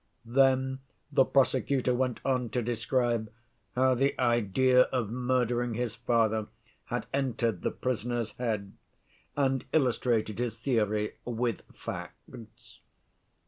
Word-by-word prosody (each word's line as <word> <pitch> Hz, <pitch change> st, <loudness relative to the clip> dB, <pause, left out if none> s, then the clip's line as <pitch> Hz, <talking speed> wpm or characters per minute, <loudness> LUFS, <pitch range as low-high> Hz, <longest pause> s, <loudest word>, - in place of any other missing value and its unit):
Then 130 Hz, +2 st, +3 dB, 0.3 s
the 135 Hz, -2 st, +5 dB
prosecutor 130 Hz, -1 st, +2 dB
went 125 Hz, -1 st, -1 dB
on 125 Hz, -3 st, +1 dB
to 120 Hz, -, +1 dB
describe 120 Hz, -1 st, 0 dB, 0.4 s
how 130 Hz, +1 st, +4 dB
the 135 Hz, +3 st, +1 dB
idea 125 Hz, +1 st, +4 dB
of 120 Hz, -5 st, -2 dB
murdering 125 Hz, -1 st, 0 dB
his 120 Hz, -1 st, -2 dB
father 115 Hz, -2 st, +1 dB, 0.4 s
had -, -, -3 dB
entered 125 Hz, -4 st, 0 dB
the -, -, 0 dB
prisoner's 120 Hz, -2 st, -2 dB
head, 110 Hz, -5 st, -3 dB, 0.6 s
and 135 Hz, -2 st, +1 dB
illustrated 120 Hz, -6 st, +1 dB
his 120 Hz, -2 st, -2 dB
theory 110 Hz, -4 st, 0 dB
with 120 Hz, -2 st, -2 dB
facts. 110 Hz, -2 st, -9 dB
120 Hz, 110 wpm, -29 LUFS, 115-130 Hz, 0.6 s, the